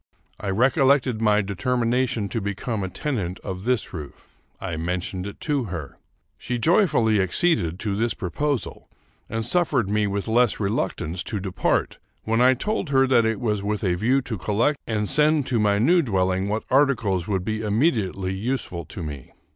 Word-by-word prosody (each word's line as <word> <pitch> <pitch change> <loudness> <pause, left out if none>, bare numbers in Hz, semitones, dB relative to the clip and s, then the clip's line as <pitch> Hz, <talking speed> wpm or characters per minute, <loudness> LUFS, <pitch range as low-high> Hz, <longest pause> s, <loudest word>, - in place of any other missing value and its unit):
I 100 - -4
recollected 130 +2 +3
my 105 -1 +4
determination 115 +2 0
to 115 - -2
become 100 +2 -3
a 95 - -3
tenant 100 -9 -3
of 95 0 -6
this 125 -3 0
roof. 75 -5 -9 0.3
I 85 - -4
men 90 +3 -1
tioned 90 +2 -4
it 100 - -9
to 145 -5 0
her. 85 -8 -7 0.4
She 125 - -3
joyfully 125 - +3
acceded 95 - +1
to 100 -3 -1
this 115 +3 0
proposal, 135 - -3 0.4
and 115 0 -2
suffered 130 - +1
me 105 0 +2
with 100 +1 -3
less 120 +1 +2
reluctance 95 -4 -2
to 105 - -3
depart 95 -2 -1 0.2
when 115 +2 +1
I 130 +1 +6
told 215 - -2
her 135 -1 +4
that 125 -3 +3
it 110 -2 -1
was 105 -4 -1
with 105 +1 -2
a 90 -3 +2
view 125 +9 +1
to 115 -6 -5
collect 115 +10 +1
and 105 -2 -1
send 150 +1 +3
to 120 -4 0
my 105 -1 +3
new 170 - +4
dwelling 95 - 0
what 110 +2 -1
articles 115 -10 +2
would 95 -3 -1
be 110 0 -2
immediately 105 - 0
useful 100 - -3
to 85 +3 -8
me. 75 -4 -8
110 Hz, 175 wpm, -24 LUFS, 95-125 Hz, 0.4 s, I